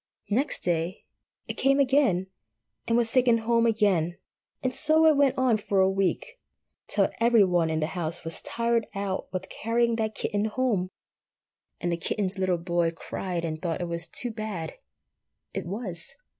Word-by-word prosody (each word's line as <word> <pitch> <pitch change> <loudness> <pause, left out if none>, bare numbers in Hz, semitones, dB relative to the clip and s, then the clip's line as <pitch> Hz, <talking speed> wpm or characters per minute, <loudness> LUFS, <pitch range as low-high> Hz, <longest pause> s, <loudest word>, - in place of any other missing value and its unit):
Next 265 +8 0
day 170 +2 -1 0.4
it - - -5
came 275 +1 +3
again, 265 -9 +3 0.6
and 230 - +3
was 235 -1 +1
taken 245 -3 +4
home 230 +1 +2
again. 195 -7 +2 0.5
And 255 0 0
so 310 +3 +4
it 315 -1 +6
went 280 -2 +3
on 255 -4 +3
for 205 -2 0
a 190 0 +4
week, 195 - -1 0.5
till - - +1
every 230 -2 +5
one 175 -3 +2
in 160 0 -1
the - - +2
house 170 0 -4
was 165 0 -4
tired 230 -1 0
out 195 -1 -3
with 185 0 -4
carrying 235 +1 0
that 220 -1 -1
kitten 205 -1 -1
home, 220 -5 0 0.9
and 175 - -1
the 170 - 0
kitten's 190 +2 -2
little 185 -2 +1
boy 170 0 0
cried 170 +1 -4
and 155 -1 -4
thought 170 -3 -2
it 175 - -2
was 170 0 -1
too 245 - -2
bad. 215 -7 -5 0.8
It - - -4
was. 185 -4 -4
205 Hz, 170 wpm, -27 LUFS, 175-235 Hz, 0.9 s, it